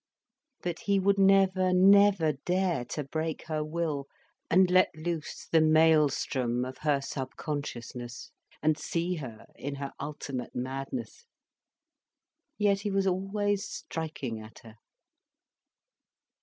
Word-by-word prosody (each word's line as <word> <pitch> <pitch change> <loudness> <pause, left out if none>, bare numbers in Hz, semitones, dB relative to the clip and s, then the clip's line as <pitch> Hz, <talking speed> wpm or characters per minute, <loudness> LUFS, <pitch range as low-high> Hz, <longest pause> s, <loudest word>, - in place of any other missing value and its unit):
But 175 -2 -3
he 200 -1 +1
would 200 +1 +2
never, 190 -1 +4
never 195 -3 +6
dare 175 -1 -1
to 150 - -4
break 160 +3 -3
her 155 -2 -2
will, 155 -3 -2 0.4
and 185 +1 +5
let 185 0 +5
loose 160 0 -4
the 160 - +3
maelstrom 150 -6 +3
of 130 0 -8
her 145 -2 +1
subconsciousness, 130 -3 -5 0.3
and 155 0 +2
see 175 +1 -2
her 120 -7 -8
in 140 +1 -5
her 140 0 -5
ultimate 140 -4 -5
madness. 135 - -5 1.3
Yet 205 -2 +2
he 205 - -3
was 195 0 +1
always 195 +2 0
striking 145 -8 -5
at 110 +1 -12
her. 115 -1 -14
160 Hz, 115 wpm, -29 LUFS, 140-185 Hz, 1.3 s, never